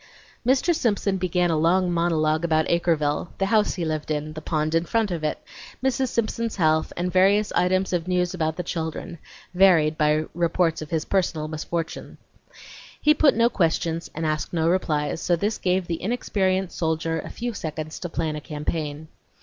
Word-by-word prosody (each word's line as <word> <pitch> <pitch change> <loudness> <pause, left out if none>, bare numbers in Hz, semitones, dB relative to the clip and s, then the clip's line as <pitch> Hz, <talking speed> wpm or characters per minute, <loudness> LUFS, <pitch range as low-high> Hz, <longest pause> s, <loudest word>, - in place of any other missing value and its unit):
Mr. 260 +8 +3
Simpson 205 -8 0
began 180 -1 +1
a - - +2
long 175 +3 +3
monologue 160 -2 +1
about 160 -2 +2
Acreville, 165 -3 +1
the 195 - +1
house 210 +1 +2
he 175 -3 -2
lived 155 -1 -3
in, 155 0 -2
the 155 - -7
pond 155 0 -1
in 165 0 +3
front 220 +2 0
of 165 -3 -3
it, 155 - 0 0.5
Mrs. 265 0 +1
Simpson's 230 -1 -2
health, 160 -3 +2
and 175 0 -2
various 200 +3 +4
items 185 +1 +1
of 175 -1 -1
news 180 -1 +1
about 160 -3 -1
the 180 - -4
children, 165 +1 -4 0.3
varied 170 -5 +4
by 150 +1 +2
reports 170 -1 +1
of 155 - -7
his 160 -2 -1
personal 170 -5 0
misfortunes. 160 +1 -5 0.8
He 300 - +5
put 305 -2 +4
no 230 +1 +4
questions, 165 -4 0
and 160 +1 -2
asked 155 +2 -2
no 165 -1 +1
replies, 160 -3 0
so 175 - +2
this 205 +6 -2
gave 185 0 +1
the 170 -1 -4
inexperienced 190 -4 -1
soldier 165 0 -1
a - - -7
few 240 0 -4
seconds 155 -4 -5
to 175 - -5
plan 160 -1 -2
a 150 - -5
campaign. 150 0 -4
170 Hz, 180 wpm, -24 LUFS, 155-190 Hz, 0.8 s, He